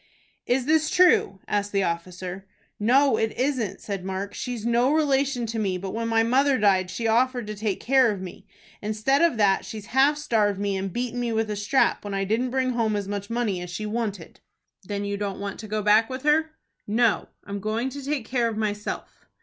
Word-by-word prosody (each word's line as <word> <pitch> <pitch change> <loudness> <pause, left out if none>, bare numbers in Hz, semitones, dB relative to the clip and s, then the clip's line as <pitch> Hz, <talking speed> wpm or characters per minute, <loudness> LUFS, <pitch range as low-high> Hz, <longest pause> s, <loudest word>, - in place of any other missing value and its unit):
"Is 250 +1 +1
this 310 +1 +3
true?" 355 - +4
asked 205 0 -1
the 195 -1 +1
officer. 180 +2 -4 0.3
"No, 255 +3 +4
it 220 0 -1
isn't," 250 -7 -1
said 200 -3 -5
Mark. 190 +1 -4
"She's 245 -3 -5
no 240 +3 +3
relation 275 -5 +1
to 225 0 -3
me, 195 -3 0
but 190 +1 -5
when 230 +1 -2
my 225 0 +3
mother 265 +4 +3
died 190 -4 +3
she 230 - -4
offered 245 +2 +2
to 215 - -5
take 205 -1 -2
care 260 -1 +4
of 205 -3 -2
me. 185 -1 -9 0.3
Instead 215 +7 +1
of 335 -8 +3
that 200 -2 +3
she's 215 -2 -8
half 275 +3 +4
starved 215 -9 +1
me, 200 -1 -1
and 190 0 -3
beaten 245 +3 -3
me 240 -1 -1
with 220 -1 0
a - - -2
strap 205 +7 +1
when 205 -1 -4
I 195 - 0
didn't 225 +6 0
bring 260 0 0
home 225 -3 0
as 200 -1 -3
much 200 0 -4
money 230 -6 -1
as 180 - -6
she 200 +5 -5
wanted." 210 -5 -4 0.4
"Then 200 +1 -4
you 200 0 -2
don't 200 -2 -4
want 200 -1 -5
to 220 - -7
go 215 0 -2
back 215 +2 +4
with 260 0 -5
her?" 310 +2 +3 0.4
"No, 225 +1 +2 0.2
I'm 200 0 -5
going 220 +5 -1
to 280 0 -7
take 280 -3 -2
care 240 -1 0
of 225 -2 -4
myself." 210 -1 -4
220 Hz, 215 wpm, -25 LUFS, 200-250 Hz, 0.4 s, true